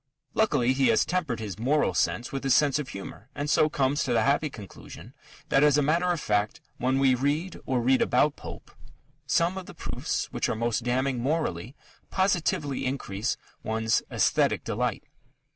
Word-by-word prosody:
Luckily, 130 Hz, -, +2 dB
he 135 Hz, 0 st, +2 dB
has -, -, +3 dB
tempered 165 Hz, -11 st, -1 dB
his 105 Hz, -2 st, -6 dB
moral 145 Hz, +6 st, +2 dB
sense 120 Hz, -, 0 dB
with 135 Hz, 0 st, -4 dB
his 135 Hz, -3 st, +3 dB
sense 145 Hz, +1 st, +3 dB
of 140 Hz, -3 st, -5 dB
humour, 100 Hz, +4 st, -9 dB
and 145 Hz, +1 st, -3 dB
so 155 Hz, -, +4 dB
comes 145 Hz, +1 st, +1 dB
to 125 Hz, -, -1 dB
the 115 Hz, -, +3 dB
happy 145 Hz, +3 st, +2 dB
conclusion 105 Hz, -8 st, -11 dB, 0.4 s
that 135 Hz, -, +4 dB
as 150 Hz, -1 st, +5 dB
a 145 Hz, -, +3 dB
matter 165 Hz, +5 st, +2 dB
of 175 Hz, -, -1 dB
fact, 105 Hz, -4 st, 0 dB, 0.2 s
when 130 Hz, +2 st, +1 dB
we 135 Hz, -1 st, +4 dB
read 145 Hz, +8 st, -1 dB
or 130 Hz, -3 st, +1 dB
read 130 Hz, +2 st, +3 dB
about 145 Hz, +4 st, +3 dB
Pope, -, -, -10 dB, 0.6 s
"some 170 Hz, +3 st, +1 dB
of 185 Hz, -, -11 dB
the -, -, -11 dB
proofs -, -, -3 dB
which -, -, -1 dB
are -, -, 0 dB
most 115 Hz, +1 st, -1 dB
damning 130 Hz, +1 st, 0 dB
morally, 130 Hz, -, -2 dB, 0.3 s
positively 175 Hz, -7 st, 0 dB
increase 120 Hz, -4 st, -2 dB, 0.2 s
one's 110 Hz, 0 st, 0 dB
aesthetic -, -, +2 dB
delight." -, -, -2 dB
135 Hz, 175 wpm, -27 LUFS, 120-150 Hz, 0.6 s, as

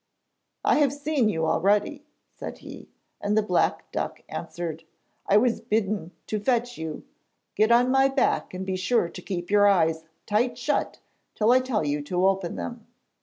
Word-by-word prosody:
'I -, -, +4 dB
have 285 Hz, -3 st, +3 dB
seen 290 Hz, -5 st, 0 dB
you 160 Hz, -5 st, -1 dB
already,' 205 Hz, -, +1 dB, 0.3 s
said -, -, -7 dB
he, -, -, -10 dB, 0.3 s
and 205 Hz, +1 st, 0 dB
the 215 Hz, -, +4 dB
black 180 Hz, -4 st, 0 dB
duck -, -, -4 dB
answered: 165 Hz, -2 st, -5 dB, 0.5 s
'I 200 Hz, -, +6 dB
was 230 Hz, 0 st, +2 dB
bidden 210 Hz, -5 st, -1 dB, 0.2 s
to 215 Hz, -, -2 dB
fetch 245 Hz, +2 st, 0 dB
you. 160 Hz, -1 st, -6 dB, 0.5 s
Get 215 Hz, +2 st, +2 dB
on 245 Hz, +2 st, +5 dB
my 270 Hz, 0 st, +5 dB
back 270 Hz, -1 st, 0 dB
and 185 Hz, +1 st, -5 dB
be 190 Hz, -1 st, -2 dB
sure 185 Hz, 0 st, +1 dB
to 180 Hz, -, -9 dB
keep 175 Hz, -1 st, -5 dB
your 205 Hz, 0 st, +6 dB
eyes 160 Hz, -5 st, +2 dB, 0.2 s
tight 225 Hz, +4 st, 0 dB
shut -, -, -1 dB, 0.4 s
till 220 Hz, +2 st, +3 dB
I 255 Hz, -, +6 dB
tell 255 Hz, -10 st, -1 dB
you 145 Hz, 0 st, -1 dB
to 180 Hz, +5 st, 0 dB
open 190 Hz, -2 st, +1 dB
them.' 85 Hz, -1 st, -6 dB
205 Hz, 170 wpm, -25 LUFS, 175-245 Hz, 0.5 s, I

